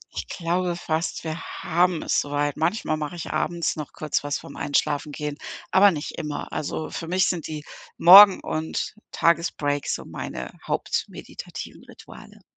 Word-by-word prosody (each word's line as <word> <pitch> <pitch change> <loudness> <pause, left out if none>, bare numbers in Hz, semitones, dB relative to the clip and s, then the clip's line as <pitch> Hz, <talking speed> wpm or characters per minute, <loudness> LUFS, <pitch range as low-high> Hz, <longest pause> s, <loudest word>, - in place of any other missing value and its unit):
Ich - - -4
glaube 175 +1 -1
fast, 165 -1 -2
wir 160 0 -4 0.2
haben 175 0 +2
es - - +2
so 145 - -7
weit. 145 0 0
Manchmal 160 0 0
mache 150 +2 -4
ich 170 - -6
abends 170 -1 -1
noch 150 -2 -7
kurz 150 -1 -2
was 145 -1 -1
vor - - -11
'm - - -12
Einschlafen 145 +1 0
gehen, 150 0 -5 0.3
aber 200 +1 +7
nicht 155 -2 -4
immer. 150 -3 -5
Also, 155 +1 -3
für 165 - -5
mich 185 +2 +2
sind 175 -3 -2
die 155 -1 -6 0.3
Morgen 195 +3 +10
und 155 0 -3 0.2
Tagesbreaks 155 -4 +1
so - - -8
meine - - -6 0.2
hauptmeditativen - - -5
Rituale. - - -14
160 Hz, 160 wpm, -24 LUFS, 150-175 Hz, 0.3 s, Morgen